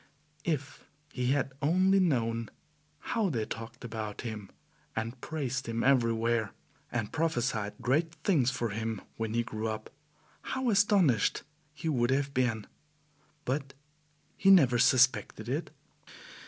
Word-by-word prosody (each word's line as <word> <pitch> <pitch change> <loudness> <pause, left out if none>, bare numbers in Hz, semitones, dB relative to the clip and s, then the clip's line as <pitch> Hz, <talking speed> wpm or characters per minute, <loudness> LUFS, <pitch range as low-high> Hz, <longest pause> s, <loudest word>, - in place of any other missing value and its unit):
If 145 -4 -2 0.3
he 125 -1 -1
had 135 0 +1
only 185 +6 +4
known 115 -9 +1 0.5
how 225 -5 -1
they 115 -8 -1
talked 115 +2 -7
about 110 -2 -5
him 110 -4 -6 0.5
and 115 +3 -4
praised 130 -5 -3
him 115 0 -1
everywhere, 115 -4 +2 0.4
and 115 -3 -2
prophesied 125 -10 0
great 160 +6 +1
things 145 -11 +3
for 125 -3 -2
him 110 0 -3 0.2
when 115 0 -2
he 120 - +2
grew 110 -1 -4
up, 110 0 -5 0.5
how 260 -2 -1
astonished 195 - +3 0.3
he 165 - -5
would 120 -6 +2
have 140 +1 +1
been! 120 -5 0 0.8
But 135 +1 -2 0.6
he 195 - +3
never 135 -11 +6
suspected 130 +1 +3
it. - - -2
125 Hz, 125 wpm, -30 LUFS, 115-150 Hz, 0.8 s, never